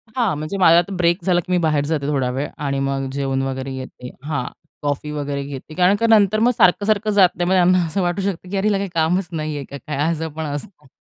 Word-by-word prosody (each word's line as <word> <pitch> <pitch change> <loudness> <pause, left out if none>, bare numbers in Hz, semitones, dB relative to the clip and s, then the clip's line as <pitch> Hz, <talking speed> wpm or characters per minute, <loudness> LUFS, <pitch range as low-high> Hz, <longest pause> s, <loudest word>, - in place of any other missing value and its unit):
हां, 230 - +1
म्हणजे 155 +6 -4
माझा 170 -3 +6
आता 185 +3 -3
ब्रेक 170 +1 +1
झाला, 180 -2 +2
की 175 - -6
मी 180 - +3
बाहेर 150 -2 +1
जाते 145 -2 -2
थोडा 135 -4 0
वेळ 135 +3 -2 0.2
आणि 140 -1 -1
मग 135 -1 -2
जेवण 135 -1 -1
वगैरे 135 0 -4
घेते. 130 -1 -8
हां, 145 -4 -2 0.4
कॉफी 145 +1 -2
वगैरे 145 -1 -3
घेते. 140 +2 -8
कारण 185 +3 +4
का 230 - +2
नंतर 215 -1 +4
मग 235 +3 +4
सारखं-सारखं 210 +3 +3
जात 195 -3 +5
नाही. 175 0 -1
मग - - +3
त्यांना 180 -1 +4
असं 165 +5 -2
वाटू 175 +2 -1
शकतं, 185 -2 -3
की 200 - -2
"अरे, 195 - +1
हिला 205 -2 +2
काही 195 0 -3
कामच 170 +3 +1
नाहीये 155 -3 -3
का 140 - -7
काय?" 150 0 -6
असं 160 0 -3
पण 160 0 -4
असतं. 145 +1 -7
160 Hz, 240 wpm, -20 LUFS, 140-190 Hz, 0.4 s, माझा